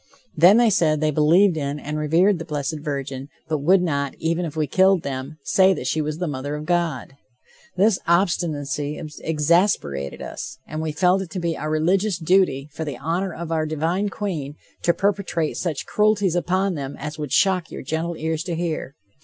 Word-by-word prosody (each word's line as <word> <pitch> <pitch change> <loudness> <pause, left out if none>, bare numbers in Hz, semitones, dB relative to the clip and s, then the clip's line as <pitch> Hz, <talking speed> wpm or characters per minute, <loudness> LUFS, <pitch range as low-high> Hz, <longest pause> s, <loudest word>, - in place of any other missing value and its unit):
Then 180 +6 +7
they 235 -2 +4
said 155 -5 +2
they 155 0 +1
believed 165 +6 +4
in 145 0 -3
and 150 +1 -5
revered 170 +5 +3
the - - -4
blessed 150 -1 -3
virgin, 140 -2 -5 0.2
but 155 -1 -1
would 180 +6 +4
not, 140 -5 -1
even 165 +2 -1
if 160 - -6
we 155 - +1
killed 190 +4 +3
them, 135 +2 -5
say 190 +4 +4
that 135 - -6
she 155 +4 0
was 150 0 -3
the 180 - -2
mother 145 0 -4
of 150 0 -6
God. 165 -7 -1 0.6
This 200 +1 +3
obstinacy 150 -5 0 0.2
exasperated 150 - +1
us - - -7
and 155 0 -5
we 160 -1 -2
felt 180 +4 +2
it 190 - -6
to 190 - -4
be 170 -1 -1
our 155 - -4
religious 180 +5 +1
duty, 170 -5 +2
for 160 - -4
the 145 -5 -5
honor 170 +7 -2
of 165 0 -6
our 155 -1 0
divine 165 +6 -1
Queen, 160 -9 -4 0.3
to 170 - +3
perpetrate 185 -3 -1
such 165 -6 -3
cruelties 210 -4 +2
upon 185 +2 0
them 140 -3 -5
as 150 +1 -6
would 150 -3 -4
shock 180 +2 +2
your - - -7
gentle 160 +4 -3
ears 160 0 -2
to 175 -2 -2
hear. 160 -5 -3
160 Hz, 190 wpm, -22 LUFS, 150-180 Hz, 0.6 s, Then